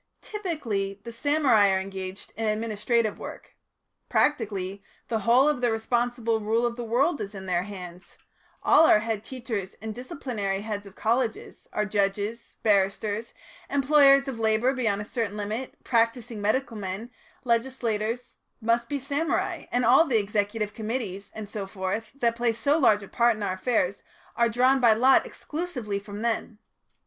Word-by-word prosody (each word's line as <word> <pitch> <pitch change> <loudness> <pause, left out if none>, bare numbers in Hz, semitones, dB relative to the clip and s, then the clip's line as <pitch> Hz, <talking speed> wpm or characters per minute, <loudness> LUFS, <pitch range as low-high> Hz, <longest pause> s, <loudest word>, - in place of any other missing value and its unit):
Typically, 230 - -3
the 235 - -7
samurai 260 -5 +3
are 190 0 +2
engaged 190 0 -7
in 225 0 -2
administrative 220 +1 0
work. - - -9 0.5
Practically 200 -8 0 0.3
the 225 -2 0
whole 240 +7 +4
of 300 -5 +1
the 240 -2 +2
responsible 235 0 0
rule 225 +3 +1
of 235 -1 -1
the 240 - -5
world 270 +8 +1
is 200 0 -6
in 190 -1 -7
their 180 -2 +1
hands; 180 -2 -9 0.5
all 320 - +6
our 210 - +6
head 220 -2 -2
teachers 230 -7 -5
and 220 0 -5
disciplinary 220 -5 -3
heads 205 -1 -5
of 195 - -14
colleges, 230 0 -1
our 210 - 0
judges, 205 +2 -2
barristers, 205 +2 +1 0.3
employers 275 0 +5
of 255 -4 -4
labour 220 +4 +2
beyond 220 -6 0
a - - -11
certain 220 -3 -3
limit, 215 +5 -4
practising 230 -1 0
medical 230 +3 0
men, 205 +3 -5 0.3
legislators, 235 -1 -1 0.2
must 230 +1 +1
be 290 - -1
samurai, 285 +4 -1
and 245 0 +1
all 255 +7 +7
the 255 -7 +2
executive 205 0 -1
committees, 215 -4 -4
and 215 -1 -6
so 205 -2 -5
forth, 195 +3 -3
that 235 -4 +1
play 235 0 +1
so 280 +6 +1
large 215 -10 +4
a - - -9
part 235 +2 +3
in 215 - -5
our 190 - 0
affairs 195 -2 0 0.3
are 235 0 +3
drawn 255 +4 +3
by 235 -3 +6
lot 255 +5 +4
exclusively 265 - -4
from 205 +1 -8
them. 230 -1 -1
225 Hz, 160 wpm, -26 LUFS, 205-245 Hz, 0.5 s, all